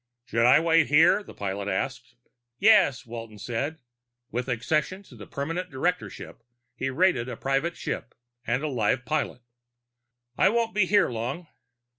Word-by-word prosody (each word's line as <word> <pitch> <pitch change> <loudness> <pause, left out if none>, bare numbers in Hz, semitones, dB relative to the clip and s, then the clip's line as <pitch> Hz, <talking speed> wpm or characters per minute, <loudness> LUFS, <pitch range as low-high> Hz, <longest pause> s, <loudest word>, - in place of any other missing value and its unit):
"Should 115 +1 +2
I 130 +4 +7
wait 165 -1 +3
here?" 160 +7 +5
the - - -13
pilot 100 0 -4
asked. 120 +5 -3 0.4
"Yes," 170 - +4
Walton 115 -2 -8
said. 125 +9 -3 0.5
With 125 +2 -3
accession 150 - -1
to 135 - -16
the 105 -3 -11
permanent 165 +6 -4
directorship 165 -1 -3 0.3
he 135 - -2
rated 130 -4 +2
a - - -6
private 135 +6 -1
ship - - -5 0.3
and 125 +5 0
a - - 0
live 125 -2 0
pilot. 150 -5 -2 1.0
"I 190 - +6
won't 230 0 0
be 200 -2 +2
here 205 +1 +4
long." 125 +9 -4
135 Hz, 150 wpm, -26 LUFS, 120-170 Hz, 1.0 s, I